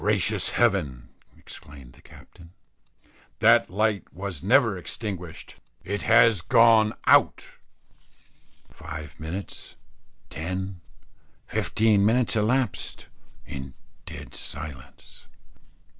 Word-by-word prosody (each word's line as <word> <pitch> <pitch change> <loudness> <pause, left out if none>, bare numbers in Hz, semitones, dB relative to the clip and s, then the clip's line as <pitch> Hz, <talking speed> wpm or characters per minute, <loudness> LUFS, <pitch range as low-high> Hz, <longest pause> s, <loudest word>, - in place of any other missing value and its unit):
"Gracious - - +1
heavens!" 65 -3 0 0.3
exclaimed 70 -4 -13
the - - -20
Captain, 85 +1 -17 0.8
"that 115 +1 +4
light 105 +1 -1
was 95 -4 -6
never - - +3
extinguished: 95 -7 -6 0.3
it 100 +3 -3
has 115 -4 +5
gone 110 +2 +5
out." - - +4 1.3
Five 75 0 -9
minutes, 85 +6 -7 0.6
ten, 95 +2 -5 0.6
fifteen 110 -2 +1
minutes 115 +3 +2
elapsed 115 +1 -1 0.4
in 65 -1 -8 0.3
dead - - -9
silence. 70 -3 -9
95 Hz, 85 wpm, -25 LUFS, 75-110 Hz, 1.3 s, has